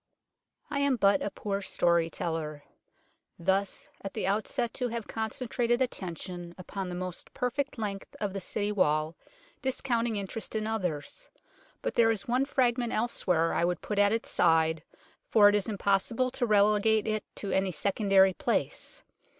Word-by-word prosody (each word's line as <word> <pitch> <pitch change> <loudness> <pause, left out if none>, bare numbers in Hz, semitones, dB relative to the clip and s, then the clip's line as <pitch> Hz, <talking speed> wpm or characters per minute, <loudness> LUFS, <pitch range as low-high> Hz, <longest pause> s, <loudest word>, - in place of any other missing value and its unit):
I 280 - 0
am 280 -2 +3
but 200 -3 +3
a - - -1
poor 200 0 -3
story 170 -3 +2
teller, 155 -3 -4 0.7
thus 190 +3 0 0.2
at 195 - -6
the - - -1
outset 225 +4 -1
to 250 - -1
have 230 -2 -4
concentrated 240 +1 -1
attention 175 - -4
upon 190 +1 -5
the 180 - -4
most 180 -1 -5
perfect 260 +3 -2
length 200 -3 -5
of 205 -2 -2
the 195 - -4
City 205 +3 -2
Wall, 155 -5 +1 0.5
discounting 240 -3 0
in 200 -1 -2
terest 220 +3 -6
in 215 -1 -1
others; 215 - -3 0.5
but - - -1
there 230 -1 +4
is 215 -3 -1
one 250 +3 +2
fragment 245 -3 +1
else 235 0 -1
where 165 -2 +3
I - - +1
would 175 0 0
put 210 -1 -2
at 205 0 +5
its 225 +1 -1
side, 160 -1 +3 0.5
for 205 -2 +7
it - - +1
is 205 +1 +1
impossible 210 +5 +1
to 250 -2 -1
relegate 210 +1 +4
it 215 -1 -1
to 200 - -4
any 190 0 +2
secondary 195 +1 +3
place. - - 0
205 Hz, 165 wpm, -29 LUFS, 185-235 Hz, 0.7 s, for